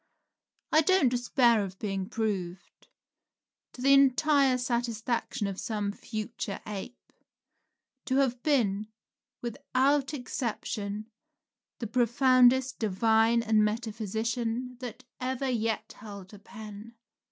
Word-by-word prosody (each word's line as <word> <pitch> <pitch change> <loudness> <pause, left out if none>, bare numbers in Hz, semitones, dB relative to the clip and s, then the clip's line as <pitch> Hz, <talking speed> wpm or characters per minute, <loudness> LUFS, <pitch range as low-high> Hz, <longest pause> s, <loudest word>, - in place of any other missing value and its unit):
I 315 - +6
don't 320 -4 +4
despair 240 -2 +3
of 190 -1 -7
being 195 -2 -3
proved, 195 -5 -4 0.9
to 250 - -8
the 275 +1 +6
entire 275 0 +4
satisfaction 235 -3 -2
of 195 -1 -4
some 210 -2 -2
future 210 -1 -5
ape, 210 +4 -8 0.9
to 260 - 0
have 260 -3 +1
been, 215 -9 +1 0.6
without 265 +4 +1
exception, 215 -4 -4 0.7
the 235 - -5
profoundest 255 +2 +3
divine 225 +2 +3
and 215 -1 +3
metaphysician 230 +3 -2
that 250 0 -7 0.2
ever 260 +1 -2
yet 225 -2 -2
held 200 -2 -11
a 205 - -11
pen. 215 +1 -10
230 Hz, 105 wpm, -29 LUFS, 210-255 Hz, 0.9 s, I